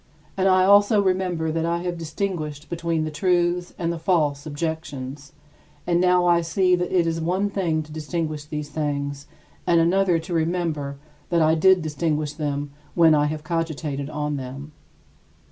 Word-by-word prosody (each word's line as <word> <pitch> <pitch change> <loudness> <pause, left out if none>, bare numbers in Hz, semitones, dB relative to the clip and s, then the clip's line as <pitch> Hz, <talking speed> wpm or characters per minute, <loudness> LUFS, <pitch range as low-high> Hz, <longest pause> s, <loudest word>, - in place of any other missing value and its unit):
And 190 0 +2
I 185 -1 +5
also 205 +2 +5
remember 185 -4 0
that 165 +1 -1
I 170 +1 -1
have 175 -1 -2
distinguished 160 -3 -4
between 165 -1 -1
the 155 - -3
truths 175 +2 0
and 170 -1 -1
the 165 - -6
false 155 -4 +1
objections, 145 -3 -5 0.5
and 175 0 +2
now 180 -1 +4
I 170 -1 +4
see 180 +2 +2
that 180 0 -2
it 175 -2 +3
is 165 0 -1
one 185 +5 0
thing 165 -6 0
to 155 - -15
distinguish 155 -1 -3
these 150 -1 -5
things 145 -2 -3 0.4
and 170 -1 +4
another 180 +1 +3
to 165 +2 -5
remember 160 -4 -1 0.3
that 170 -2 +3
I 155 +1 +4
did 185 +2 +4
distinguish 150 -1 -1
them 145 -2 -3 0.2
when 165 -2 +6
I 150 -1 +3
have 150 0 -4
cogitated 155 -3 -3
on 150 -1 -2
them. 135 +3 -7
165 Hz, 165 wpm, -23 LUFS, 150-175 Hz, 0.5 s, when